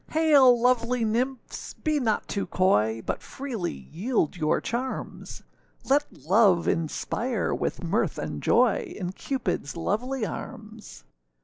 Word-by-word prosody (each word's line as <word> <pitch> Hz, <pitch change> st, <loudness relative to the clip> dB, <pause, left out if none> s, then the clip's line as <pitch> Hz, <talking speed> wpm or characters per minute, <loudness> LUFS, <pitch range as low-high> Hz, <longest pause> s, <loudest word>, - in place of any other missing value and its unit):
Hail! 285 Hz, -6 st, +6 dB
lovely 245 Hz, -1 st, +2 dB
nymphs, 245 Hz, +4 st, -3 dB
be 310 Hz, -2 st, 0 dB
not 225 Hz, -5 st, 0 dB
too 200 Hz, -, -2 dB
coy, 115 Hz, -, +2 dB
But -, -, -3 dB
freely 245 Hz, -10 st, -4 dB
yield 165 Hz, -, -2 dB
your 155 Hz, -3 st, +1 dB
charms; 255 Hz, +3 st, -5 dB, 0.4 s
Let 285 Hz, +2 st, +2 dB
love 190 Hz, -1 st, +3 dB
inspire 220 Hz, +9 st, -1 dB
with -, -, -2 dB
mirth -, -, 0 dB
and -, -, -4 dB
joy, 400 Hz, -8 st, +2 dB
In 180 Hz, -2 st, -3 dB
Cupidâs 225 Hz, -, -3 dB
lovely 225 Hz, +8 st, -1 dB
arms. 215 Hz, -, -8 dB
230 Hz, 120 wpm, -26 LUFS, 180-260 Hz, 0.4 s, Hail